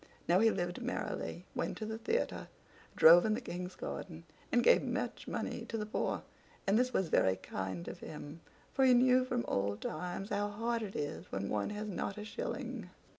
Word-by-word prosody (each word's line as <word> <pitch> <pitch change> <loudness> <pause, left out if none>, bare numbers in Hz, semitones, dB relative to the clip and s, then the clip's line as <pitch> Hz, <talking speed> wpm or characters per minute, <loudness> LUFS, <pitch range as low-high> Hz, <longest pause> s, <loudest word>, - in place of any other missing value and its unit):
Now 175 +2 +5
he 225 +2 +6
lived 175 0 -2
merrily, 250 +1 -3
went - - -2
to 215 - -4
the 220 +1 -4
theater, 455 - -1 0.5
drove 170 +2 +9
in 215 -1 +2
the - - -2
King's 180 -6 -5
garden, 165 -3 -6 0.3
and 240 - +4
gave - - +7
much 245 -1 -3
money - - -3
to 225 - -4
the 210 - -2
poor; 215 - -1 0.4
and 195 - +3
this 250 0 +2
was 190 -8 +1
very 95 0 +4
kind 95 -2 -5
of - - -6
him, 150 +1 -8 0.3
for 270 - +3
he 255 -1 +7
knew 255 +1 +5
from 250 -1 -1
old 100 +1 0
times 180 +5 -4
how 205 0 0
hard 230 +3 -1
it 205 -3 -5
is 145 -1 -4
when 100 +1 -2
one 105 -1 0
has 210 0 -4
not 195 0 -3
a 210 - -5
shilling. - - -4
205 Hz, 195 wpm, -34 LUFS, 170-240 Hz, 0.5 s, drove